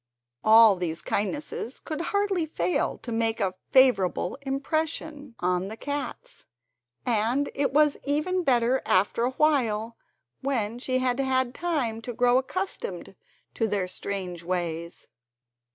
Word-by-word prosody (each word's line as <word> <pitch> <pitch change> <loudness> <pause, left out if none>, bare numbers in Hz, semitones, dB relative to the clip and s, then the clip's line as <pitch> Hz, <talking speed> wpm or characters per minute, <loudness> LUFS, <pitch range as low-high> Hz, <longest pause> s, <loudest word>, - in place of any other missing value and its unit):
All 220 -1 +8
these 170 -2 -2
kindnesses 250 +3 -3
could 315 0 -5
hardly 390 -2 0
fail 180 - -1
to 240 - -5
make 225 0 0
a 190 -2 0 0.2
favourable 205 -9 +3
impression 290 0 -3
on 180 +1 0
the 220 +2 -7
cats, 285 -1 -5 0.6
and 240 +4 +1
it 280 0 0
was 300 +1 +4
even 305 +6 0
better 250 -2 +2
after 205 +5 +2
a 250 - 0
while, 235 -7 +1 0.4
when 240 -4 -1
she 255 0 0
had 255 0 0
had 260 -2 +1
time 270 -11 -2
to 245 +1 -6
grow 245 +2 +4
accustomed 375 - -4 0.4
to 225 - 0
their 200 -3 -1
strange 185 -2 -5
ways. 170 -1 -4
245 Hz, 130 wpm, -26 LUFS, 210-285 Hz, 0.6 s, All